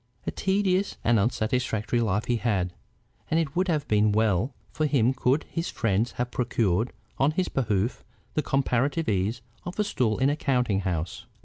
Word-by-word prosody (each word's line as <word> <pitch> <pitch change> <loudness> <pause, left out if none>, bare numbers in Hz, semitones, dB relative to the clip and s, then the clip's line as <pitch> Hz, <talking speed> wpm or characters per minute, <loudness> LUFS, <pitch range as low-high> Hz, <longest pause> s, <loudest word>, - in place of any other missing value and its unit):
A - - -1
tedious 190 0 +1
and 115 -2 +4
unsatisfactory 110 +1 0
life 105 -2 0
he 120 - +1
had, 95 -7 0 0.6
and 160 - +3
it 150 -4 -2
would 185 +2 +2
have 155 -4 0
been 105 0 +3
well 110 +2 +2 0.2
for 155 0 0
him 130 -3 +3
could 130 +3 +1
his 165 +1 -4
friends 110 +2 0
have 125 0 -2
procured 115 -3 +1 0.3
on 135 - +4
his 185 +2 0
behoof 110 -3 0 0.3
the 155 - +1
comparative 135 +3 +1
ease 105 +3 0 0.2
of 175 +1 -6
a 210 - +3
stool 120 - 0
in 135 +2 +3
a - - 0
counting 125 -9 +1
house. 90 -4 -3
120 Hz, 175 wpm, -27 LUFS, 105-145 Hz, 0.6 s, and